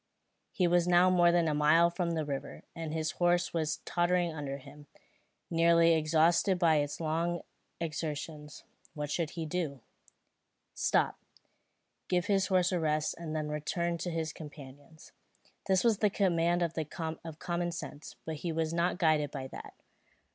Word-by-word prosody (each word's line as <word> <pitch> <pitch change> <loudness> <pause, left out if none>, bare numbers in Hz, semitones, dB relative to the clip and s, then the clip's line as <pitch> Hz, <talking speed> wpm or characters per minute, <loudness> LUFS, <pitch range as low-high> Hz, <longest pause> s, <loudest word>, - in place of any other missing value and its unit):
He 185 - +1
was 175 0 +3
now 180 +1 +5
more 175 -1 +5
than 170 -1 +2
a 155 - +1
mile 155 +3 +4
from 170 -1 -1
the 155 -1 -1
river, 140 -1 -5
and 165 -2 -5
his 160 -1 -1
horse 175 +1 +1
was 155 -2 -1
tottering 175 -1 +1
under 140 -3 -4
him, 145 +2 -14 0.6
nearly 170 0 +5
exhausted 165 +4 +3
by 165 -3 +4
its 145 0 -2
long 165 +2 -1 0.4
exertions. 155 -2 -5 0.3
What 150 -1 -4
should 170 +2 -2
he 165 - -2
do? 155 -5 -3 0.9
Stop, - - +1 0.9
give 180 -1 +1
his 195 -2 +2
horse 185 -2 +2
a 180 - +1
rest, 155 -1 0
and 160 -2 -5
then 155 -1 -2
return 170 +3 -2
to 175 - -3
his 165 -2 -3
companions. 145 0 -12 0.6
This 190 -1 +3
was 230 -4 +3
the 210 - +3
command 175 -3 +2
of 160 0 -4
common 175 +1 -2
sense; 155 -2 -8
but 160 -1 -4
he 170 +3 -3
was 160 0 -1
not 170 +1 +1
guided 155 -4 +2
by 135 -2 -6
that. - - -10
165 Hz, 155 wpm, -31 LUFS, 155-175 Hz, 0.9 s, now